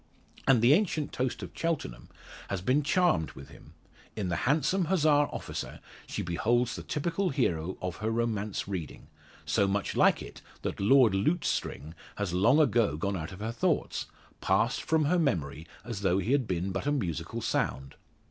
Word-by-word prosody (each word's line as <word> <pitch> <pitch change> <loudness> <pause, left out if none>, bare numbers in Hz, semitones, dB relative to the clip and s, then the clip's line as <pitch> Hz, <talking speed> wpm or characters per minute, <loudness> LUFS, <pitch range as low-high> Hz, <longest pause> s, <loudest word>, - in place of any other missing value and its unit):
And 125 -4 +5
the 125 +4 +7
ancient 160 -5 0
toast 130 -1 -2
of - - -7
Cheltenham 165 - -3 0.4
has 100 - -2
been 130 +9 +2
charmed 155 - +2
with 70 - -11
him. - - -16 0.4
In 100 -4 -2
the 85 - 0
handsome 170 +5 +2
Hussar 150 -4 +3
officer - - -6 0.3
she - - -3
beholds 115 +8 +1
the - - -6
typical 170 +5 -1
hero 90 - -1
of 90 -1 -3
her 110 +1 -2
romance 110 -3 -1
reading; 90 -7 -6 0.4
so 100 - +2
much 100 +1 -1
like - - +4
it, - - -11 0.2
that - - -3
Lord 115 +1 +5
Lutestring 95 - -1 0.2
has 100 -4 -3
long 110 - +4
ago 115 - +3
gone 100 +5 -1
out 80 -1 -5
of 95 +2 -10
her 110 +1 -2
thoughts 115 - -1 0.3
passed - - +1
from 160 -2 +1
her 175 +4 +2
memory 80 - -1 0.2
as 115 -4 -5
though 95 -2 +2
he 100 +5 -1
had 135 -4 +2
been 90 +1 -2
but 95 +8 -3
a - - +3
musical 90 - -2
sound. 65 +2 -2
115 Hz, 175 wpm, -29 LUFS, 90-145 Hz, 0.4 s, the